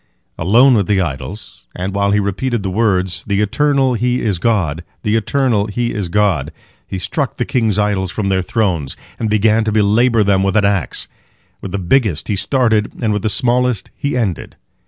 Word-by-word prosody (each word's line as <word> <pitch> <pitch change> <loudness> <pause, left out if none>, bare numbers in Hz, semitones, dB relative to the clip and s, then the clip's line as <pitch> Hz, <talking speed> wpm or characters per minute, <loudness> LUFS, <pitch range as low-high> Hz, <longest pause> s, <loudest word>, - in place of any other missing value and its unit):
Alone 120 +10 +4
with 105 -5 +2
the 100 -2 +2
idols, 75 - -5
and 95 +2 -4
while 100 0 +1
he 105 +1 +2
repeated 105 +3 -2
the 95 - -2
words, 95 -4 0
"The 100 -1 0
Eternal 135 +5 +2
He 125 +2 0
is 100 -6 -1
God, 90 -8 0 0.2
the 105 +1 +1
Eternal 115 -2 +1
He 120 +3 -2
is 100 -4 -2
God!" 90 -7 +1 0.4
he 95 - -4
struck 120 - -3
the 125 - -1
king's 110 -5 0
idols 100 -3 0
from 100 +1 -2
their 95 -1 +1
thrones, 90 - -1 0.2
and 110 - -1
began 110 +1 +3
to 110 - 0
belabor 110 +2 +3
them 100 -1 +2
with 95 -1 0
an 105 -2 +3
axe. 100 -3 -1 0.5
With 95 - -6
the 100 - -2
biggest 95 - 0
he 105 - +1
started, 110 +1 +1
and 110 -2 +1
with 105 - -1
the 110 - 0
smallest 125 +1 0
he 140 -2 -2
ended. 100 -9 -3
105 Hz, 190 wpm, -17 LUFS, 95-115 Hz, 0.5 s, Alone